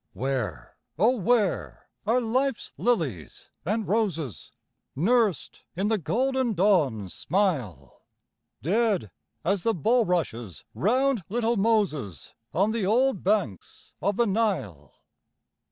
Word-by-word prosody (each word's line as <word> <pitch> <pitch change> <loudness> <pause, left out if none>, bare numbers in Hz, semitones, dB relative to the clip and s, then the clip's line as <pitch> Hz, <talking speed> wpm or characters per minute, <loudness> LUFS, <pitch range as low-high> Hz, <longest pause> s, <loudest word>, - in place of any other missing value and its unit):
Where, 125 - -3 0.2
oh 225 +9 +4
where 215 -1 0 0.2
are 235 +3 +3
life's 255 +2 -1
lilies 155 - -2
and 210 +6 -1
roses, 180 - -2 0.4
Nursed 210 - +1
in 195 +4 0
the 220 -2 +1
golden 255 - 0
dawn's 145 - +2
smile? 135 - -2 0.6
Dead 195 - +1 0.3
as 195 +1 +1
the 225 +4 +1
bulrushes 175 - 0
round 255 +3 +1
little 235 +2 +1
Moses, 195 - 0 0.2
On 200 +5 +2
the 225 -2 -1
old 235 +3 +2
banks 190 - -2
of 200 +1 0
the 235 - +3
Nile. 190 - -1
200 Hz, 105 wpm, -26 LUFS, 145-230 Hz, 0.6 s, oh